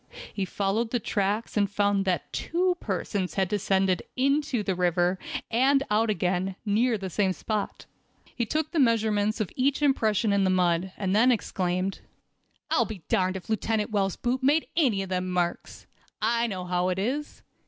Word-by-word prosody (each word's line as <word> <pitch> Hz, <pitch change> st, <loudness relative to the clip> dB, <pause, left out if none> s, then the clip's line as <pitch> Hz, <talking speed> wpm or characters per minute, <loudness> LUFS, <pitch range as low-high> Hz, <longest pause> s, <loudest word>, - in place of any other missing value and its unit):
He 195 Hz, -, -2 dB
followed 205 Hz, +5 st, -1 dB
the 245 Hz, -, 0 dB
tracks, 205 Hz, +1 st, -1 dB
and 205 Hz, -2 st, +2 dB
found 200 Hz, -1 st, +1 dB
that 185 Hz, -2 st, -1 dB
two 360 Hz, +2 st, 0 dB
persons 190 Hz, -1 st, -3 dB
had 190 Hz, -1 st, +1 dB
descended 190 Hz, -2 st, +1 dB
into 275 Hz, -2 st, +1 dB
the 195 Hz, -, 0 dB
river, 180 Hz, +1 st, +1 dB, 0.3 s
and 270 Hz, +4 st, +3 dB
out 220 Hz, +2 st, +2 dB
again, 185 Hz, -1 st, 0 dB
near 225 Hz, +3 st, +2 dB
the 195 Hz, -1 st, -5 dB
same 190 Hz, 0 st, +1 dB
spot. 215 Hz, +2 st, -4 dB, 0.5 s
He 240 Hz, -, 0 dB
took 310 Hz, +7 st, -1 dB
the 335 Hz, -, 0 dB
measurement 220 Hz, -4 st, +2 dB
of 215 Hz, -, -2 dB
each 275 Hz, +3 st, +1 dB
impression 220 Hz, -6 st, +2 dB
in 200 Hz, -1 st, +3 dB
the 190 Hz, -, +2 dB
mud, 180 Hz, 0 st, +1 dB
and 195 Hz, -1 st, 0 dB
then 240 Hz, +4 st, +5 dB
exclaimed: 185 Hz, -4 st, -1 dB, 0.7 s
"I'll -, -, +3 dB
be 205 Hz, -7 st, -8 dB
darned 185 Hz, 0 st, +1 dB
if 185 Hz, -, -11 dB
Lieutenant 220 Hz, 0 st, -1 dB
Wells' 195 Hz, -3 st, 0 dB
boot 255 Hz, +2 st, -1 dB
made 290 Hz, +4 st, +3 dB
any 245 Hz, -12 st, +2 dB
of 190 Hz, -, -8 dB
them 185 Hz, 0 st, -1 dB
marks! 175 Hz, -1 st, -2 dB, 0.3 s
I 235 Hz, +2 st, +1 dB
know 185 Hz, -4 st, -4 dB
how 180 Hz, 0 st, 0 dB
it 180 Hz, -, -1 dB
is. 265 Hz, +10 st, -3 dB
205 Hz, 175 wpm, -27 LUFS, 185-235 Hz, 0.7 s, then